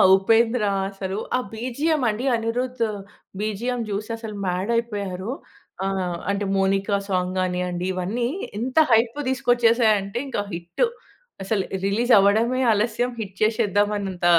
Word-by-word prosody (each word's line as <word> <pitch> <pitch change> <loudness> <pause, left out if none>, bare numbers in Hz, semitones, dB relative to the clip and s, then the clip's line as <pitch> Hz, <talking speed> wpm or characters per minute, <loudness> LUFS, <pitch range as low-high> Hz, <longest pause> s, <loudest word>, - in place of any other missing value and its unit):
ఉపేంద్ర 225 +4 +3 0.3
అసలు 195 0 -5 0.2
ఆ - - 0
బీజీఎం 270 +7 -1
అండి 215 +5 -2
అనిరుద్ 240 +2 -1 0.6
బీజీఎం 215 +4 -2
చూసి 210 +2 -3
అసలు 220 -2 -7
మాడ్ 185 +5 -1
అయిపోయారు. 205 -3 -2 0.5
ఆహ్, 185 -3 -1
అంటే 200 0 0
మౌనిక 195 +1 +1
సాంగ్ 185 -1 0
గానివ్వండి, 180 -1 -1
ఇవన్నీ 200 +7 -1 0.3
ఎంత 255 +2 -3 0.2
హైప్ 230 +3 +3
తీసుకొచ్చేసాయి 240 -3 +3
అంటే 200 +3 -6
ఇంకా 250 -6 -2
హిట్. 170 - -2 0.6
అసలు 195 0 0 0.2
రిలీజ్ 235 +5 +1
అవ్వడమే 225 +6 +3
ఆలస్యం 225 +3 +1
హిట్ 195 -3 -6
చేసేద్దాం 210 -2 +2
అన్నంత 190 -3 -4
215 Hz, 125 wpm, -23 LUFS, 195-235 Hz, 0.6 s, ఉపేంద్ర